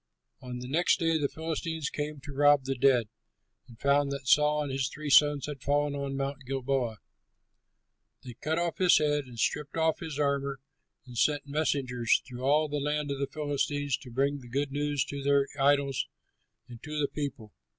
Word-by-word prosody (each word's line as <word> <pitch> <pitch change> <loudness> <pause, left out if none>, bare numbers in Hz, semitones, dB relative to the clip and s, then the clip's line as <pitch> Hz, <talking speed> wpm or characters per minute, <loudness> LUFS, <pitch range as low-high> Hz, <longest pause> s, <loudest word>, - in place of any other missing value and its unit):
On 125 -1 -6
the 125 0 -7
next 165 +7 +2
day, 165 -1 +1
the 145 - +1
Philistines 160 -1 -3
came 150 0 -4
to 140 +2 -9
rob 145 0 +5
the 135 +1 -1
dead, 125 -3 +3 0.6
and 115 -3 -16
found 140 0 +2
that 140 -2 -5
Saul 150 +2 +4
and 145 - -4
his 135 -2 -1
three 150 0 -5
sons 145 -1 +5
had 145 -3 -7
fallen 145 +1 +1
on 140 -1 -3
Mount 135 0 -3
Gilboa. 130 -4 -1 1.3
They 125 -2 -8
cut 155 +7 -2
off 170 -1 -1
his 180 -2 +6
head 145 -1 +1
and 125 -2 -12
stripped 150 +7 -1
off 160 -1 +2
his 160 -4 -6
armor 140 -1 0 0.5
and 125 -2 -12
sent 145 -2 +2
messengers 135 -5 +1
through 125 -1 -9
all 150 +4 +3
the 145 0 -3
land 150 0 -1
of 140 - -3
the 140 - -1
Philistines 145 -1 -1
to 130 - -12
bring 140 +4 0
the 125 -2 -13
good 140 +3 -1
news 145 0 0
to 140 0 -6
their 140 0 +3
idols 140 -1 +2 0.6
and 120 -2 -11
to 150 0 -5
the 145 - +2
people. 135 -9 -5
140 Hz, 190 wpm, -29 LUFS, 135-150 Hz, 1.3 s, his